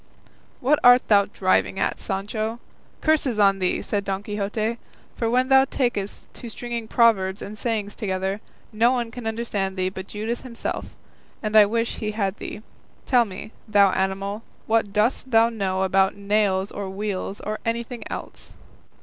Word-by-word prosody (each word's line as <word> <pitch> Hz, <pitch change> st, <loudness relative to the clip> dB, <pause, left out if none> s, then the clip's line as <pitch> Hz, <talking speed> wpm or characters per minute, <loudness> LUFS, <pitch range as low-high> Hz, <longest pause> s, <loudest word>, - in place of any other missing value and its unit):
"What 285 Hz, +4 st, +3 dB
art 245 Hz, 0 st, +7 dB
thou 200 Hz, -2 st, +6 dB
driving 190 Hz, -1 st, +1 dB
at, -, -, 0 dB
Sancho? 215 Hz, +3 st, -3 dB, 0.4 s
curses 295 Hz, -7 st, +2 dB
on 195 Hz, -2 st, +4 dB
thee!" 185 Hz, -1 st, 0 dB
said 205 Hz, -1 st, -1 dB
Don 195 Hz, 0 st, -3 dB
Quixote; 215 Hz, +2 st, -2 dB, 0.4 s
"for 230 Hz, -, -1 dB
when 255 Hz, +2 st, +2 dB
thou 265 Hz, 0 st, +6 dB
takest 240 Hz, -7 st, -3 dB
to 235 Hz, -, -8 dB
stringing 235 Hz, 0 st, -5 dB
proverbs 205 Hz, -5 st, +3 dB
and 210 Hz, -, -7 dB
sayings 215 Hz, -2 st, -2 dB
together, 190 Hz, 0 st, -2 dB, 0.3 s
no 230 Hz, +3 st, +4 dB
one 240 Hz, -3 st, -1 dB
can 240 Hz, -2 st, -6 dB
understand 210 Hz, -4 st, -2 dB
thee 185 Hz, 0 st, +1 dB
but 190 Hz, 0 st, -8 dB
Judas 220 Hz, +4 st, -4 dB
himself, 235 Hz, -3 st, -5 dB, 0.6 s
and 215 Hz, 0 st, -2 dB
I 210 Hz, -1 st, +8 dB
wish 230 Hz, +2 st, -1 dB
he 215 Hz, -1 st, -3 dB
had 200 Hz, -2 st, -1 dB
thee. 215 Hz, -, -7 dB, 0.4 s
Tell 245 Hz, -3 st, +4 dB
me, 205 Hz, +1 st, -8 dB, 0.2 s
thou 200 Hz, -2 st, +5 dB
animal, 195 Hz, +3 st, -1 dB, 0.2 s
what 220 Hz, -2 st, +1 dB
dost 220 Hz, +5 st, +1 dB
thou 230 Hz, -1 st, +5 dB
know 190 Hz, -4 st, -1 dB
about 190 Hz, 0 st, +3 dB
nails 200 Hz, -1 st, +1 dB
or 200 Hz, -1 st, -5 dB
wheels, 195 Hz, 0 st, -4 dB
or 215 Hz, +1 st, -4 dB
anything 235 Hz, +1 st, -3 dB
else?" -, -, -8 dB
215 Hz, 160 wpm, -24 LUFS, 195-230 Hz, 0.6 s, I